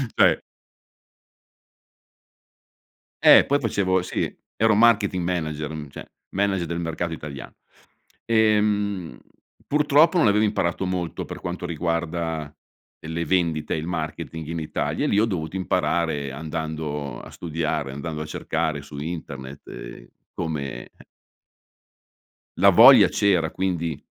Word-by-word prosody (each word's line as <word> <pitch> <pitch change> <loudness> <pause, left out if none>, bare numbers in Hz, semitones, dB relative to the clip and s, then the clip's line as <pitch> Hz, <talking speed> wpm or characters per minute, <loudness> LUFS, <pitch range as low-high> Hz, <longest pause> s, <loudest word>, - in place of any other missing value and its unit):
Cioè. - - +4 2.8
Eh, - - +8
poi 145 +1 +2
facevo 95 -7 +1
sì, - - -2 0.2
ero 110 0 +3
marketing 105 -5 +3
manager, 80 -4 -2
mhmm, 75 -2 -7
cioè - - -9 0.3
manager 95 -3 0
del 85 +1 -3
mercato 85 0 -3
italiano. 75 -3 -8 0.7
Ehm, 105 - +1 0.5
purtroppo 150 +3 +4
non 160 - +4
avevo 105 +1 +3
imparato 95 -3 -1
molto, 90 -2 -3
per - - -8
quanto 90 0 -5
riguarda, 85 -1 -2 0.6
ehm, 80 - -8
le 85 +1 -2
vendite 80 -3 0
e - - -1
il 80 +1 -4
marketing 80 -1 -5
in 85 +1 -3
Italia 75 - -2
e - - +1
lì 100 - +3
ho 110 - +4
dovuto 90 -4 -3
imparare 80 -5 0
andando 75 -1 -4
a - - -11
studiare, 80 -4 -3
andando 75 +3 -5
a - - -4
cercare 75 -1 -2
su 70 0 -11
internet, 70 -4 -7
ehm, - - -9 0.3
come 70 -6 -5 1.7
La - - +7
voglia - - +9
c'era, 90 -6 +1
quindi 85 -5 -2
85 Hz, 125 wpm, -24 LUFS, 75-95 Hz, 2.8 s, voglia